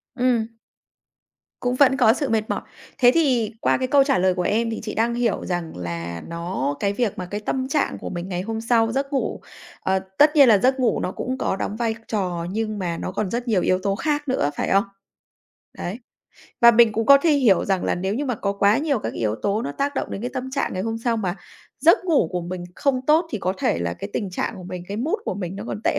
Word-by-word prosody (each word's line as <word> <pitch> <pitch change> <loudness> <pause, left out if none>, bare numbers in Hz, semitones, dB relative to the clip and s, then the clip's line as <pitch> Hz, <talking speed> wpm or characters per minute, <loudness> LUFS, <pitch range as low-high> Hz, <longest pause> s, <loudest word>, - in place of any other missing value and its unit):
Ừm. 245 -3 +2 1.1
Cũng 245 0 -1
vẫn 270 0 +4
có 230 -5 +5
sự 280 +1 -2
mệt 220 -1 0
mỏi. - - -1 0.4
Thế 245 -2 +7
thì 255 -9 +2
qua - - +2
cái 255 - -1
câu 280 +1 +5
trả 270 -1 +2
lời 185 0 +3
của 180 - -2
em 225 +5 +1
thì 225 - -4
chị 215 - -5
đang 230 +2 +1
hiểu 235 -3 0
rằng 175 - -4
là 85 -1 -5
nó 170 -4 -3
cái 200 0 0
việc 220 -1 -1
mà 185 - -4
cái 205 +4 -5
tâm 260 +5 -2
trạng 285 +3 0
của - - -6
mình 175 +1 -5
ngày 180 -1 -2
hôm 220 +3 -4
sau, 225 -1 +2
giấc 275 +3 -2
ngủ 270 - -1 0.4
ờ, 190 0 0 0.2
tất 295 +1 +5
nhiên 280 -4 +7
là 215 - +7
giấc 260 +6 +2
ngủ 250 -3 +2
nó - - -2
cũng 255 +6 -4
có 225 - -1
đóng 200 - -3
vai 225 -1 -1
trò, 180 -5 -2
nhưng 215 0 -2
mà 175 -3 -2
nó - - -4
còn 200 +1 -2
rất 240 +4 -3
nhiều 210 -6 +2
yếu 185 +1 +2
tố 195 -1 0
khác 295 +5 -1
nữa, 255 - +1
phải - - -2
không? 195 +1 +4 0.9
Đấy. 195 +7 -5 0.6
Và 235 - +9
mình 230 -1 +5
cũng 220 +1 -1
có 280 0 +9
thể 320 +4 +2
hiểu 255 -10 +4
rằng 190 -2 0
là - - +1
nếu 190 +3 -2
như 280 +6 -2
mà 255 -3 -1
có 200 -1 -1
quá 200 +3 +3
nhiều 285 -3 0
các - - -4
cái - - -9
yếu 110 -2 0
tố 205 +2 0
nó 140 - -4
tác 285 - -2
động - - -3
đến - - -5
cái 245 - -3
tâm 260 0 -4
trạng 275 - -1
ngày 185 - -2
hôm 225 +1 -3
sau, 230 0 0
mà 190 -4 -2 0.4
giấc 335 +4 +5
ngủ 310 - +2
của 180 -1 -2
mình 175 +1 -5
không 265 -3 0
tốt 315 +3 +4
thì 220 - -3
có 185 0 -1
thể - - +1
là 85 0 -2
cái 95 +3 -7
tình 200 - -3
trạng 180 - -3
của 185 - -9
mình, 180 0 -6
cái 200 - -4
mood 290 - -1
của - - -2
mình 185 -1 -5
nó 205 - -6
còn 210 - -5
tệ - - +2
220 Hz, 260 wpm, -23 LUFS, 185-255 Hz, 1.1 s, Và